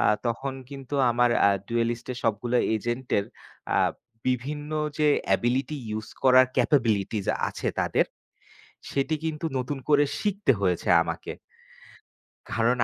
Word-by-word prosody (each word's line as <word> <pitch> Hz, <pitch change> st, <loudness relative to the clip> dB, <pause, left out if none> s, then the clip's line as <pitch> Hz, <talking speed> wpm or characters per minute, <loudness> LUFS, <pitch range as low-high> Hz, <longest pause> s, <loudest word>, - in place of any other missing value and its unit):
আ -, -, +1 dB, 0.2 s
তখন 130 Hz, +3 st, -2 dB, 0.2 s
কিন্তু 135 Hz, 0 st, -7 dB, 0.2 s
আমার 120 Hz, +1 st, +3 dB, 0.2 s
আ -, -, +5 dB, 0.2 s
ডুয়েলিস্টের 120 Hz, +1 st, -1 dB
সবগুলো 115 Hz, +3 st, +1 dB, 0.2 s
এজেন্টের 120 Hz, -1 st, -1 dB, 0.5 s
আ -, -, +4 dB, 0.5 s
বিভিন্ন 145 Hz, +4 st, -2 dB, 0.3 s
যে 150 Hz, -, +4 dB, 0.2 s
অ্যাবিলিটি 120 Hz, +9 st, +1 dB
ইউজ 110 Hz, +1 st, -4 dB
করার 130 Hz, -1 st, +7 dB
ক্যাপাবিলিটিজ 115 Hz, -6 st, +1 dB, 0.2 s
আছে -, -, -3 dB
তাদের। -, -, +2 dB, 0.9 s
সেটি 140 Hz, +3 st, 0 dB
কিন্তু 160 Hz, 0 st, -3 dB
নতুন 130 Hz, +3 st, -3 dB
করে 145 Hz, -1 st, +5 dB, 0.2 s
শিখতে 200 Hz, -7 st, +2 dB
হয়েছে 90 Hz, -3 st, 0 dB
আমাকে। 85 Hz, -1 st, -5 dB, 1.2 s
কারণ, 115 Hz, +2 st, +2 dB
125 Hz, 115 wpm, -26 LUFS, 115-140 Hz, 1.2 s, করার